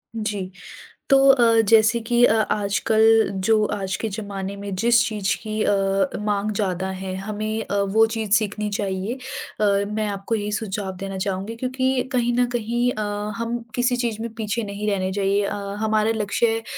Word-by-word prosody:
जी, 205 -4 -3 0.6
तो 275 - +7
अ, 235 -4 +5
जैसे 225 +1 +5
कि 240 +2 +2
अ, 220 - +5 0.2
आजकल 210 +2 +1 0.4
जो 220 -1 +4
आज 195 -2 -3
के 225 - -3
ज़माने 200 -2 -5
में 200 -1 -5
जिस 235 +4 +4
चीज़ 205 -2 -1
की 215 -1 -2
अ, - - +2 0.5
माँग 210 0 0
ज़्यादा 190 -2 -1
है 190 -1 -4
हमें 215 +2 -3
अ, 200 - -2
वो 210 +3 +3
चीज़ 220 -2 -3
सीखनी 210 -1 +1
चाहिए 195 +2 -2 0.5
अ, - - +3 0.3
मैं 215 0 -1
आपको 200 +3 -3
यही 210 -1 -2
सुझाव 205 -2 -3
देना 195 0 -5
चाहूँगी, 195 +3 -3
क्योंकि 260 +1 0
कहीं 240 -1 +1
न 245 - +4
कहीं 240 +2 0
अ, 215 - -4 0.3
हम 230 +1 -2 0.2
किसी 245 0 +1
चीज़ 230 -3 -2
में 230 -1 -5
पीछे 225 +1 -2
नहीं 205 +1 -4
रहना 190 -2 -1
चाहिए। 200 +1 +1
अ, - - -2 0.3
हमारा 220 0 +2
लक्ष्य 225 +2 0
215 Hz, 170 wpm, -23 LUFS, 200-230 Hz, 0.6 s, तो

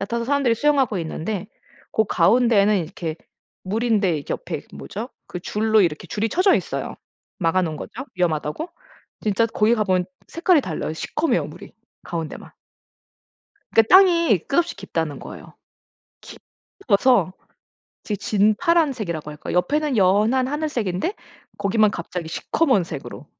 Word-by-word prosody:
얕아서 235 +4 -2
사람들이 270 -4 +2
수영하고 270 -7 +2
있는데 180 +5 -4 0.5
고 220 - +3
가운데는 210 +2 +4
이렇게 160 0 -5 0.5
물인데 210 -3 +1
이렇게 145 - -5
옆에 - - -5
뭐죠 70 -1 -6 0.2
그 - - -5
줄로 215 +4 +2
이렇게 165 -5 0
줄이 220 +2 -1
쳐져 370 - +3
있어요. - - -4 0.4
막아 180 0 +2
놓은 160 -3 -2
거죠 255 - -7
위험하다고. 170 - -1 0.5
진짜 215 +2 +1
거기 220 +1 +2
가 215 - +1
보면 185 -2 +1 0.2
색깔이 335 -2 +3
달라요. 160 -6 -4
시커메요 300 - -1
물이 - - -12 0.3
가운데만. 165 -3 -6 1.2
그 225 - +7
땅이 335 - +5
끝없이 340 +5 +1
깊다는 160 -3 -3
거예요. - - -11 0.7
깊어서 215 - 0 0.7
되게 210 - -2
진파란색이라고 215 - +1
할까? 150 - -7
옆에는 275 +9 +1
연한 215 +7 +3
하늘색인데 280 - -2 0.4
거기만 205 +1 +2
갑자기 170 -2 -5
시커먼 255 - +1
색으로. 150 -2 -8
210 Hz, 325 characters per minute, -22 LUFS, 180-260 Hz, 1.2 s, 그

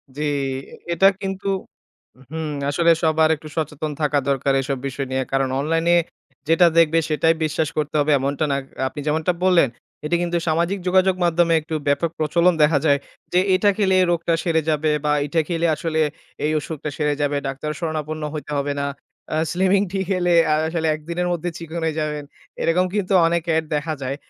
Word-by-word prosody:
জি, 150 - -5 0.7
এটা 190 +3 +5
কিন্তু 195 0 -4 0.8
হুম, 160 0 -4 0.2
আসলে 170 +4 +3
সবার 160 0 +3
একটু 155 0 -12
সচেতন 155 -1 -2
থাকা 150 -1 +2
দরকার 135 0 +1
এসব 135 0 -2
বিষয় 135 +1 -4
নিয়ে। 130 0 0
কারণ 135 -1 +1
অনলাইনে 165 +4 +1 0.5
যেটা 165 +2 +5
দেখবে, 165 0 +5
সেটাই 155 +2 +3
বিশ্বাস 155 0 -1
করতে 150 0 -2
হবে 150 +1 +2
এমনটা 140 +3 -1
না। 140 - +1 0.3
আপনি 145 - -7
যেমনটা 160 +4 +1
বললেন, 180 -6 +5 0.4
এটা 150 - +1
কিন্তু 175 0 0
সামাজিক 170 +5 +1
যোগাযোগ 185 0 +3
মাধ্যমে 170 0 +3
একটু 160 +1 -5
ব্যাপক 145 +4 +2
প্রচলন 170 +3 +3
দেখা 150 -1 +4
যায় 140 -2 +4 0.3
যে, 180 - +5 0.2
"এটা 205 +2 +3
খেলে 190 -3 +2
এ - - +4
রোগটা 170 0 0
সেরে 160 -2 +1
যাবে 155 0 +1
বা 150 - +2
এটা 160 +3 +1
খেলে 170 -1 +1
আসলে 160 +1 -2 0.5
এই 155 - +1
অসুখটা 150 0 -5
সেরে 150 -1 +1
যাবে। 145 0 0
ডাক্তারের 150 +3 -4
শরণাপন্ন 155 -2 -3
হইতে 150 -1 -6
হবে 145 +1 -1
না। 140 - -1 0.5
আ - - +1
স্লিমিং 190 +2 +2
টি 195 - -2
খেলে, 180 -2 +1 0.2
আ - - +4
আসলে 160 0 -1
একদিনের 170 +3 -3
মধ্যে 175 +1 -3
চিকন 165 0 -6 0.2
যাবেন।" 150 -1 -2 0.4
এরকম 180 +2 +2
কিন্তু 200 -2 0
অনেক 170 0 0
অ্যাড 160 0 +1
দেখা 155 +2 -2
যায়। 130 +1 -2
160 Hz, 180 wpm, -21 LUFS, 150-170 Hz, 0.8 s, এটা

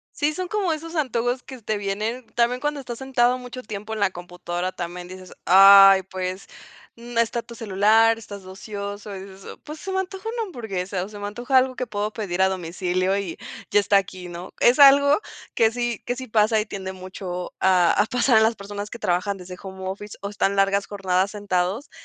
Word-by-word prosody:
Sí, 300 +1 0
son 365 +2 -4
como 390 -5 0
esos 330 +2 -7
antojos 245 -3 -1
que 260 -3 -11
te 215 0 -2
vienen 210 +5 -3
también 240 +1 +2
cuando 295 0 -2
estás 245 -3 -7
sentado 255 -2 +1
mucho 250 0 -8
tiempo 210 0 -7
en 215 - -4
la 200 -2 +3
computadora. 175 0 -5
También 175 0 -6
dices: 185 0 -11
"Ay, 195 +1 +9
pues", 185 0 -5 0.5
no 235 0 -4
está 230 0 0
tu 235 - -12
celular, 225 +1 +3
estás 205 -3 -9
de 185 - -13
ocioso, 200 +1 -7
y 190 - -7
dices: 195 0 -11
"Pues 305 +1 -9
se 385 - -6
me 380 - 0
antoja 380 +2 -5
una 465 0 -3
hamburguesa 195 - -4
o, - - -11
se 205 -1 -10
me 205 - -4
antoja 240 +6 -3
algo 255 0 +2
que 255 - -3
puedo 210 -1 -3
pedir 190 -5 -3
a 190 - +4
domicilio 185 +1 -1
y 185 -4 -5 0.3
ya 205 - +4
está 200 0 +3
aquí", 185 -2 -3
¿no? 175 +1 -8
Es 245 +4 +4
algo 280 +5 +7 0.3
que 225 -1 +3
sí 240 -2 -3
que 245 - -1
sí 260 0 -7
pasa 215 0 +3
y 210 - -1
tiende 190 -3 -6
mucho 185 -1 -7
a 180 -2 +4
a 205 - +2
pasar 245 -2 +3
en 220 - +5
las 225 +1 +2
personas 205 +1 -7
que 230 - -8
trabajan 185 +1 -1
desde 180 0 -10
home 190 -1 -7
office 200 +2 -7
o 200 - -4
están 200 -1 0
largas 195 0 +2
jornadas 190 -1 0
sentados. 200 +4 -2
205 Hz, 210 wpm, -23 LUFS, 190-240 Hz, 0.5 s, Ay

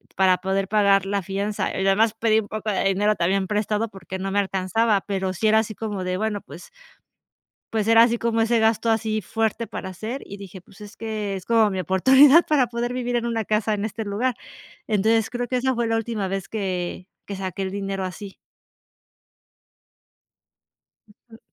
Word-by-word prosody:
para 185 -1 +4
poder 190 0 -1
pagar 200 -2 +3
la 200 0 -1
fianza 200 +3 -2
y, 190 - -1
además, 215 +3 +3
pedí 220 -1 +3
un 205 - -5
poco 215 0 -3
de 195 - -1
dinero 205 +2 +2
también 190 +3 +1
prestado 210 +1 -1
porque 190 -1 -8
no 195 +1 -3
me 205 - +1
alcanzaba. 195 +2 +1
Pero 190 -2 -2
sí 205 +5 -3
era 220 +1 +5
así 220 -1 -3
como 205 -4 -4
de, 185 0 -2
bueno, 215 -1 -2
pues. 175 - -12 1.0
Pues 220 -1 0
era 230 0 +7
así 235 0 +1
como 230 -1 0
ese 230 0 +2
gasto 225 +1 +2
así 220 -1 0
fuerte 225 +3 -2
para 190 - -6
hacer. 220 +8 -6
Y 200 - -9
dije, 195 -2 -10
pues 195 +3 -20
es 210 +1 -11
que 215 -3 -4
es 185 - -6
como 225 -2 +4
mi 190 -1 -2
oportunidad 265 - +6
para 275 -5 +2
poder 240 +1 -3
vivir 245 -1 -2
en 235 0 -1
una 225 -2 -1
casa 215 +1 0
en 205 0 -3
este 220 0 -4
lugar. 225 +5 -1 0.5
Entonces 220 +2 +2
creo 245 -1 -3
que 255 - -1
esa 260 +1 +1
fue 235 0 -1
la 225 - +1
última 225 -3 -2
vez 190 -3 -4
que, 185 -3 -4 0.2
que 200 - -5
saqué 190 0 -4
el 190 0 -3
dinero 195 -1 -3
así. 190 +2 -7 2.9
Ujú. 225 - -15
210 Hz, 190 wpm, -23 LUFS, 195-225 Hz, 2.9 s, era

